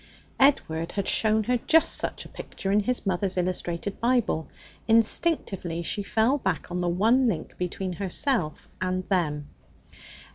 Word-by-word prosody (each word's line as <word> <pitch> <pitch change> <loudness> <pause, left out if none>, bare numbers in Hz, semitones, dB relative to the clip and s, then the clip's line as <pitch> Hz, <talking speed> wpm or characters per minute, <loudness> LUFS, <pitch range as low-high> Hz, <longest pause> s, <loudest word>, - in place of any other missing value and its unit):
Edward 165 - +2
had 200 -2 -2
shown 220 0 +3
her 250 +3 +1
just 325 0 +5
such - - -1
a - - -11
picture 195 - -5
in 205 - +4
his 240 +4 -1
mother's 190 0 -1
illustrated 180 +1 -2
Bible. 235 -9 +1 0.4
Instinctively 220 - +1
she 205 - -2
fell 225 +7 +1
back - - -2
on 180 0 -2
the 175 - 0
one 225 +9 +3
link 170 -8 -3
between 180 +1 -3
herself 190 - -1
and 185 0 -2
them. 150 -6 0
195 Hz, 145 wpm, -26 LUFS, 175-230 Hz, 0.4 s, just